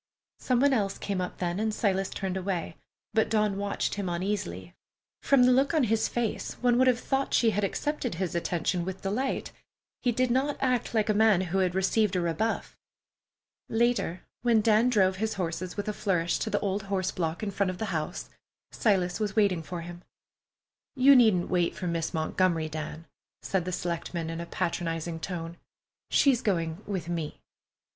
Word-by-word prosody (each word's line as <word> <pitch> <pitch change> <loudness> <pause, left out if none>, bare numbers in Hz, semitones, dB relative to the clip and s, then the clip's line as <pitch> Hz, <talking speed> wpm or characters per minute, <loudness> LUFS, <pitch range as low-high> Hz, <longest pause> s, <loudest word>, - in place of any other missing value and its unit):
Some 250 -2 +1
one 280 0 +4
else 200 -5 0
came 195 -2 -2
up 180 - -4
then, 175 +1 -2
and 220 0 0
Silas 195 -3 0
turned 190 -1 -3
away, 185 -3 -3 0.4
but 220 - +2
Dawn 210 -2 +2
watched 200 0 -1
him 200 -3 -3
uneasily. 170 - -3 0.5
From 275 -3 +4
the 250 - +6
look 270 +5 +3
on 305 - +4
his 225 -1 +2
face, 240 -3 -2
one 245 -1 +2
would 260 - +5
have 250 -2 +3
thought 270 +1 0
she 230 -2 +4
had 210 0 -1
accepted 255 - -2
his 180 0 -2
attention 175 +1 -1
with 190 +1 -6
delight. 225 +8 -2 0.5
He 245 - +2
did 250 +1 +1
not 270 +4 +1
act 250 -3 0
like 215 -1 +2
a 215 - +3
man 210 -3 +4
who 190 +1 -1
had 185 -1 +1
received 195 +1 +2
a - - +2
rebuff. 175 +7 -1 0.9
Later, 225 -6 +1 0.2
when 235 -2 +4
Dan 220 +3 +4
drove 190 -5 +3
his 220 +2 -1
horses 180 0 -3
with 205 - -3
a 210 - -1
flourish 175 -5 0
to 220 - -2
the - - +1
old 200 0 -1
horse 190 -2 0
block 165 +3 -3
in 205 - -2
front 200 -1 0
of 185 - -4
the 220 - -2
house, 160 +3 -3 0.4
Silas 185 -4 +1
was 210 -2 -2
waiting 200 -6 +3
for 170 +2 -6
him. 175 +1 -9 0.9
"You 270 +1 +7
needn't 220 -8 +5
wait 175 -2 +1
for 185 - -5
Miss 165 -2 -1
Montgomery, 160 0 0
Dan," 155 +1 -6 0.4
said 190 -3 -1
the 185 - -2
selectman 170 -1 -3
in 165 0 -4
a 170 - -6
patronizing 165 -1 -2
tone. 170 -1 -5 0.5
"She's 265 -4 +4
going 170 -6 -1
with 190 -5 -3
me." 165 -3 -4
195 Hz, 185 wpm, -28 LUFS, 175-225 Hz, 0.9 s, You